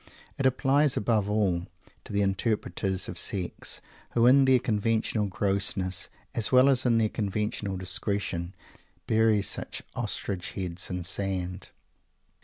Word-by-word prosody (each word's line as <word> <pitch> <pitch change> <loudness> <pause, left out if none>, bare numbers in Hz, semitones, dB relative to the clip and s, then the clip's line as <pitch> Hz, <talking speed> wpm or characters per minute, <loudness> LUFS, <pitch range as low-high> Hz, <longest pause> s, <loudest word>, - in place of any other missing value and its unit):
It 135 - +4
applies, 135 +2 +2
above 105 -2 +1
all, 95 -4 +1 0.4
to - - -9
the 100 0 +1
interpreters 95 -1 -1
of - - -3
Sex, 90 -3 -2 0.3
who, 115 0 +3
in 135 +2 +6
their 130 -1 +6
conventional 110 -2 0
grossness, 95 -2 0 0.2
as 110 - 0
well 130 +1 +6
as 130 -2 +2
in 115 -1 +4
their 110 -1 +3
conventional 105 -1 -2
discretion, 95 -1 -2 0.5
bury 110 -2 +3
such - - -2
Ostrich 90 -3 -3
heads 90 -2 -3
in 90 - -2
the 90 - -5
sand! 90 0 -2
100 Hz, 135 wpm, -28 LUFS, 95-115 Hz, 0.5 s, in